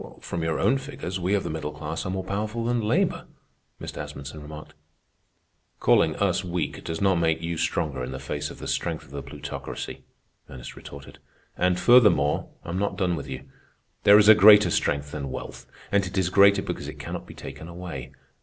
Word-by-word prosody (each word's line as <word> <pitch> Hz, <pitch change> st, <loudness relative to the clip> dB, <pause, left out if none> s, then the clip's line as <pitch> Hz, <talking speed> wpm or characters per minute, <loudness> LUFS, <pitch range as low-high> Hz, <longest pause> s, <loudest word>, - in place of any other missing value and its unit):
"From 85 Hz, -, -4 dB
your 80 Hz, -1 st, -1 dB
own 135 Hz, -, +3 dB
figures, 130 Hz, -9 st, -6 dB
we 90 Hz, +3 st, +1 dB
of 100 Hz, -, 0 dB
the -, -, -4 dB
middle 75 Hz, -1 st, -4 dB
class 75 Hz, +3 st, -5 dB
are -, -, -3 dB
more 95 Hz, 0 st, -2 dB
powerful 110 Hz, +4 st, -3 dB
than 120 Hz, 0 st, +1 dB
labor," 105 Hz, -, 0 dB, 0.5 s
Mr. -, -, -7 dB
Asmunsen 70 Hz, +2 st, -8 dB
remarked. 75 Hz, 0 st, -10 dB, 1.1 s
"Calling 80 Hz, -, +3 dB
us 95 Hz, -2 st, +1 dB
weak 85 Hz, -4 st, -3 dB
does 80 Hz, 0 st, -4 dB
not 95 Hz, -3 st, +3 dB
make 80 Hz, 0 st, +1 dB
you 85 Hz, 0 st, -2 dB
stronger 70 Hz, -4 st, -1 dB
in 60 Hz, -, -5 dB
the 65 Hz, -, -5 dB
face 65 Hz, 0 st, -4 dB
of -, -, -10 dB
the -, -, -7 dB
strength -, -, -2 dB
of -, -, -18 dB
the 70 Hz, 0 st, -5 dB
Plutocracy," 65 Hz, -2 st, -7 dB, 0.5 s
Ernest 60 Hz, -2 st, -9 dB
retorted. -, -, -11 dB, 0.4 s
"And 90 Hz, 0 st, +1 dB
furthermore, 105 Hz, -, +4 dB, 0.2 s
I'm 85 Hz, +3 st, -3 dB
not 100 Hz, -, -1 dB
done 90 Hz, -3 st, +1 dB
with 75 Hz, -, -7 dB
you. -, -, -6 dB, 0.6 s
There 100 Hz, 0 st, +8 dB
is 105 Hz, -1 st, +5 dB
a 110 Hz, -, +11 dB
greater 105 Hz, -3 st, +7 dB
strength 70 Hz, -2 st, 0 dB
than 70 Hz, -3 st, -5 dB
wealth, -, -, -7 dB, 0.2 s
and 100 Hz, -1 st, +3 dB
it 90 Hz, +2 st, -5 dB
is 95 Hz, -2 st, +2 dB
greater 100 Hz, 0 st, +6 dB
because -, -, -5 dB
it -, -, -8 dB
cannot -, -, -6 dB
be -, -, -11 dB
taken 70 Hz, +4 st, -9 dB
away. 85 Hz, -7 st, -7 dB
85 Hz, 195 wpm, -25 LUFS, 75-100 Hz, 1.1 s, a